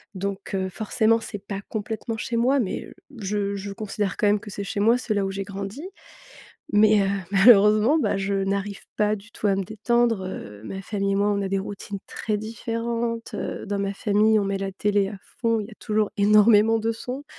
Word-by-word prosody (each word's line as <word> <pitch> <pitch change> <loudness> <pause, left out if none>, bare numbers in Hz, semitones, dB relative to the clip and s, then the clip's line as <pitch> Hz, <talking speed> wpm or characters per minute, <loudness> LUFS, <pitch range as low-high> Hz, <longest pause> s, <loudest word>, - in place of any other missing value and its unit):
Donc, 195 +1 -4
heu, 190 0 -1
forcément, 220 +3 +1
c'est 205 -2 -6
pas 200 -1 -5
complètement 220 +1 -4
chez 235 +2 -3
moi, 260 +4 +3
mais, 205 -7 -2
heu, - - -13 0.3
je 200 0 -1
je 200 0 -5
considère 205 -2 -3
quand 210 - +2
même 205 0 +3
que 210 - -10
c'est 200 - -5
chez 200 - -3
moi. 225 +4 +4
C'est 235 - -2
là 200 -1 +1
où 195 - -2
j'ai 195 +1 -4
grandi. 200 +5 -6 0.9
Mais, 210 0 +6
heu, 195 - +1 0.2
malheureusement 210 +6 +6
bah, 290 - +1
je 195 +1 -1
n'arrive 195 +1 -1 0.2
pas 210 0 +2
du 210 +2 -15
tout - - -3
à 195 - +2
me 195 - -1
détendre. 225 0 +1
Heu, 105 - -8
ma 190 +10 -6
famille 200 0 -1
et - - +1
moi, 205 +1 +2
on 200 -1 0
a 195 - -2
des 195 0 0
routines 200 0 -6
très 215 -1 -2
différentes. 230 +1 -3
Heu, - - -4
dans 200 0 -2
ma 200 0 -2
famille, 215 +2 +3
on - - -1
met 195 0 -1
la 195 0 -3
télé 200 0 +1
à 205 - -7 0.2
fond, 230 -2 +2
il 205 - -6
y - - -11
a - - -13
toujours 215 -2 0
énormément 210 +2 +5
de 225 +1 0
sons, 250 +5 -6
205 Hz, 220 wpm, -24 LUFS, 195-225 Hz, 0.9 s, Mais